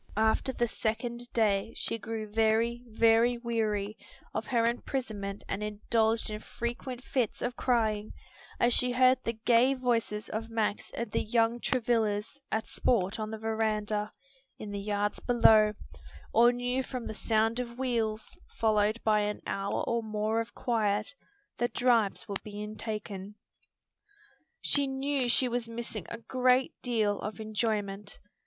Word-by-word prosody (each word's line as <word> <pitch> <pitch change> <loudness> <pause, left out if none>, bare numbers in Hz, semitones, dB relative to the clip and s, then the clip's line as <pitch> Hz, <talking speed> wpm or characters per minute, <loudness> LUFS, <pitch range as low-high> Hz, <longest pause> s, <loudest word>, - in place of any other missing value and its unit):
After 220 +4 +2
the 240 -2 0
second 235 +2 -3
day 210 -2 +1
she 230 - -1
grew 220 0 -4
very, 225 +2 +2
very 230 +2 +4
weary 220 -3 -1 0.3
of 220 0 -3
her 235 -3 +2
imprisonment 220 -4 -2
and 195 - -3
indulged 220 +2 0
in 210 - -4
frequent 240 +3 -5
fits 255 -6 -1
of 245 0 -2
crying 220 -5 +1 0.5
as 240 0 +4
she 250 +1 +2
heard 255 +1 +5
the 230 - -1
gay 250 +3 +5
voices 230 -4 0
of 225 +1 -4
Max 220 -2 -1
and 235 -2 -3
the - - +1
young 230 +1 +2
Travillas 230 0 0
at 220 0 0
sport 205 -3 +1
on 215 0 -3
the 220 - -5
veranda, 215 -1 -1 0.5
in 210 - -7
the 200 - -3
yards 205 0 -1
below, 220 -3 +5 0.6
or 240 +1 +7
knew 245 +1 -1
from 255 -2 -5
the - - -4
sound 225 +2 +1
of 240 -1 -5
wheels, 225 -4 -1 0.2
followed 215 0 +2
by 215 -1 +4
an 210 0 -1
hour 195 0 -1
or 235 0 0
more 215 +1 0
of 230 +1 -8
quiet, 220 - 0 0.5
that 240 0 -1
drives 235 -5 +2
were 200 - -4
being 210 0 -6
taken. 210 -2 -5 1.3
She 285 -1 +2
knew 270 -1 0
she 255 +2 +4
was 240 -1 -2
missing 230 -4 -5
a 230 - -5
great 255 +2 +2
deal 220 -5 +1
of 210 +2 -5
enjoyment. 210 -2 -2
225 Hz, 150 wpm, -30 LUFS, 215-240 Hz, 1.3 s, or